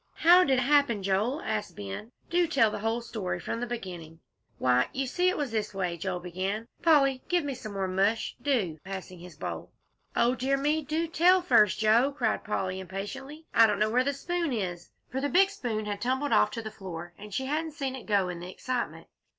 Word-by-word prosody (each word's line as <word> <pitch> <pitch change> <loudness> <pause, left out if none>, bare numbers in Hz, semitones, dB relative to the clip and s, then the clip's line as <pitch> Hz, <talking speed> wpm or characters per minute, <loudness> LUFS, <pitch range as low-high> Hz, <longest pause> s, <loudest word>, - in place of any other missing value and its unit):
"How 350 +2 +7
did 275 - +2
it - - +2
happen, 270 -6 +3
Joel?" 210 +10 0
asked 210 -5 -3
Ben. 100 - -7 0.2
"Do 350 0 +3
tell 270 -9 +3
the - - -4
whole 225 +3 -1
story 185 -7 -4
from 230 - -4
the 245 - -3
beginning." 175 -9 -7 0.4
"Why, 125 0 +2
you 270 +1 -1
see 355 +8 +1
it 370 - -1
was 285 -5 -2
this 215 -2 -2
way," 185 -2 -1
began 185 +3 -3
Joel. - - -25
"Polly, 275 -6 +4
give 355 -2 +2
me 285 -1 -2
some 215 -4 -8
more 195 -1 -1
mush, 195 +4 0
do," 205 - 0
passing 190 -2 -7
his 175 -1 -12
bowl. - - -5 0.4
"O 240 +1 +3
dear 265 +2 0
me, 300 +3 +1
do 310 +4 -1
tell 355 +3 +4
first, 210 - +4
Joe," 225 +5 +4
cried - - 0
Polly, 190 -3 -2
impatiently. 265 - -7
"I 225 0 +7
don't 210 -1 0
know 215 +1 +1
where 250 +2 +3
the 280 - +1
spoon 340 +3 -2
is," 180 -7 -3 0.2
for 265 +2 -2
the 285 - 0
big 385 +4 +4
spoon 230 - -3
had 205 -1 -4
tumbled 260 +4 0
off - - +5
to 230 - -6
the 220 - -6
floor, 175 -4 -8
and 210 +1 -10
she 265 +7 -2
hadn't 310 +3 -2
seen 275 -4 -3
it 260 - -10
go 200 -3 +2
in 175 -1 -5
the 175 +1 -7
excitement. 250 +6 -3
225 Hz, 215 wpm, -28 LUFS, 190-280 Hz, 0.4 s, How